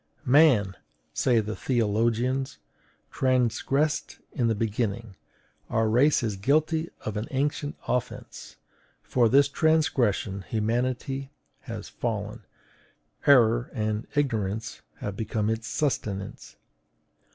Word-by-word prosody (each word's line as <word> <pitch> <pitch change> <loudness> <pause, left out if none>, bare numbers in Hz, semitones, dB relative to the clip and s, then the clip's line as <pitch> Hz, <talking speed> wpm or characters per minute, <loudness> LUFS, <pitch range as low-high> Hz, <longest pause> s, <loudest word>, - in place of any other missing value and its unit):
"Man," 125 - +5 0.4
say 120 -3 +2
the 110 0 -5
theologians, 120 +3 0 0.5
"transgressed 130 +4 0
in 120 -5 0
the 115 - +1
beginning; 110 -1 -2 0.5
our 110 0 +1
race 125 +6 +3
is 105 -4 -2
guilty 155 - +1
of 110 -1 -4
an 105 - -3
ancient 145 +2 -1
offence. 125 -1 -4 0.5
For 120 -3 +2
this 140 +3 +5
transgression 140 - +1
humanity 125 +6 -2 0.4
has 110 -3 -6
fallen; 110 -1 -4 0.8
error 120 -3 +5
and 110 -1 -2
ignorance 110 -6 -1 0.2
have 100 - -4
become 110 0 -1
its 115 +1 -3
sustenance. 105 -10 -3
115 Hz, 100 wpm, -26 LUFS, 110-135 Hz, 0.8 s, Man